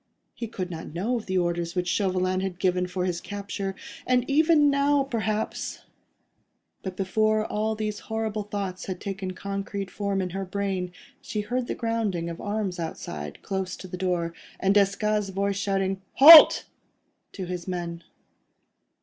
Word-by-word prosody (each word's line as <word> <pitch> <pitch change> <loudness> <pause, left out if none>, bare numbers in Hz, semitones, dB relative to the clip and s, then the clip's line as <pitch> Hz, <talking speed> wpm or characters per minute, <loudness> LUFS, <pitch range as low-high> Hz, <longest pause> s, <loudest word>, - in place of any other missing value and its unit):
He 235 - -5
could 185 -5 -5
not 160 -1 -7
know 225 +8 0
of 225 - -7
the 190 0 0
orders 175 -1 -1
which 180 -1 -1
Chauvelin 185 -1 +1
had 190 -2 -3
given 180 -1 +1
for 180 0 -2
his 175 -2 -2
capture, 200 -1 -5 0.3
and 250 -1 +2
even 300 0 +4
now, 280 0 +3
perhaps... 220 -5 -3 1.0
But 185 -1 -6
before 215 +3 +1
all 220 +1 -1
these 210 -1 -3
horrible 220 -1 -3
thoughts 200 -3 -5
had 185 -2 -4
taken 195 -1 -4
concrete 200 0 -4
form 200 -1 -2
in 185 -1 -2
her 195 +2 -3
brain, 190 -1 -2 0.3
she 210 - -3
heard 245 +4 -2
the - - -2
grounding 215 -8 -1
of 165 - -8
arms 205 -3 -2
outside, 75 - -6
close 190 -1 -3
to 185 - -9
the 180 - -6
door, 180 -2 -1 0.3
and 195 +1 +3
Desgas' 205 +1 +2
voice 195 +1 -1
shouting 195 -1 -1
"Halt!" 310 +3 +10 0.7
to 190 - -5
his 180 0 -5
men. 170 -2 -4
195 Hz, 160 wpm, -26 LUFS, 180-215 Hz, 1.0 s, Halt